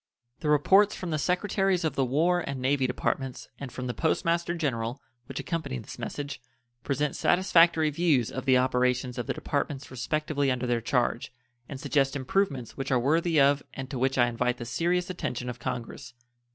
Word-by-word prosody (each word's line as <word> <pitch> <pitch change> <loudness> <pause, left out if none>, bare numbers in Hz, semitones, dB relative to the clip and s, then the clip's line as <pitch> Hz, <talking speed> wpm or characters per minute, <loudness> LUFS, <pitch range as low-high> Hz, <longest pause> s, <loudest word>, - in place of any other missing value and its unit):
The 150 - -2
reports 195 +8 +5
from 180 -3 -5
the 155 - 0
Secretaries 190 +1 +1
of 160 -4 0
the 135 - +1
War 160 +8 +2
and 140 -6 -4
Navy 130 +1 +1
Departments 130 +1 -3
and 140 -3 -6
from 125 - -6
the 125 - -2
Post 160 - 0
Master 170 +1 +1
General, 125 -6 -2 0.3
which - - -5
accompany 140 -2 -3
this 115 +1 -9
message, 140 +2 -5 0.4
present 145 +1 -1
satisfactory 170 -4 +4
views 150 -7 +2
of 130 - -5
the 130 -1 +5
operations 125 0 +1
of 120 - -4
the - - 0
Departments 140 -1 -3
respectively 145 +2 -1
under 125 -1 -1
their 120 -1 0
charge, 120 0 0 0.4
and 135 - -6
suggest 135 -1 +1
improvements 140 - -1
which 135 -1 -4
are 130 - +4
worthy 160 +5 +2
of 140 +1 +4
and 135 +1 -6
to 130 - -3
which 135 +1 +1
I 120 - +5
invite 125 +1 -1
the 120 - -6
serious 175 - 0
attention 125 -8 -3
of 120 - -11
Congress. 115 +1 -6
140 Hz, 185 wpm, -28 LUFS, 125-160 Hz, 0.4 s, reports